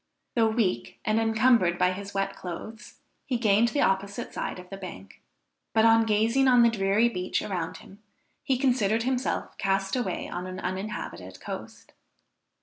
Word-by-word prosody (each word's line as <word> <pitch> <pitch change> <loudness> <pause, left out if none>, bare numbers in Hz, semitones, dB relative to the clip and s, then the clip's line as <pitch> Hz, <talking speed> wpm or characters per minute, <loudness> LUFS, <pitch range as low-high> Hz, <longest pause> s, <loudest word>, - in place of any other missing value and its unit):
Though 230 -2 +3
weak 205 - -1
and 215 +1 +2
encumbered 225 -5 +3
by 180 0 +3
his 200 +2 -6
wet 195 0 -2
clothes, 210 +5 -8 0.3
he 250 - -1
gained 220 0 +4
the 285 +4 0
opposite 200 +3 0
side - - -4
of 180 +1 -12
the 195 - -6
bank, 100 - -10 0.5
but 220 0 +5
on 225 0 +5
gazing 225 +5 +3
on 245 -2 +6
the 235 - +5
dreary 200 +2 +2
beach 185 -6 -2
around 175 -5 -3
him, 200 +2 -15 0.4
he 265 -3 0
considered 235 -5 +2
himself 255 +1 -1
cast 195 +1 0
away 225 -8 -2
on 180 +1 -5
an 185 0 -6
uninhabited 185 - -5
coast. - - -8
210 Hz, 160 wpm, -27 LUFS, 185-230 Hz, 0.5 s, on